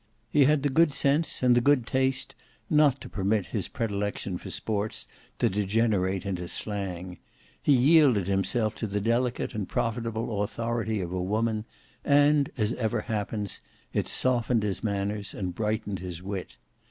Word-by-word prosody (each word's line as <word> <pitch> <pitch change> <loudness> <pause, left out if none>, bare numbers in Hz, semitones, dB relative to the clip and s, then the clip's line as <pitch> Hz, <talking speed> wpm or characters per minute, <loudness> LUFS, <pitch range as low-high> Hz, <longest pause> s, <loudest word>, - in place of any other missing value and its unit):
He 145 -2 +5
had 150 0 +3
the 145 - +2
good 160 +3 +4
sense 140 +1 +1
and 125 -1 +6
the 120 - +4
good 140 -2 +3
taste 130 +1 0 0.4
not 150 -3 +4
to - - -7
permit 100 0 0
his - - -1
predilection 100 -4 -3
for - - -8
sports 105 -1 -2 0.3
to - - +2
degenerate 100 -1 +1
into 90 -3 -3
slang; 95 -3 -4 0.4
he 145 - +4
yielded 135 - +5
himself 100 +3 0
to 110 - -2
the 105 0 -1
delicate 120 +3 0
and 105 -3 -4
profitable 115 -2 -1
authority 115 0 -1
of 90 -1 -4
woman, 105 +4 -1 0.4
and, 145 0 +4
as 105 -1 +1
ever 110 -1 -1
happens, 105 -1 -3 0.3
it - - 0
softened 120 -3 +1
his 100 -2 -2
manners 100 -1 -2
and 90 -2 -3
brightened 105 -1 -2
his 90 -1 -7
wit. 95 -1 -5
110 Hz, 155 wpm, -27 LUFS, 100-125 Hz, 0.4 s, and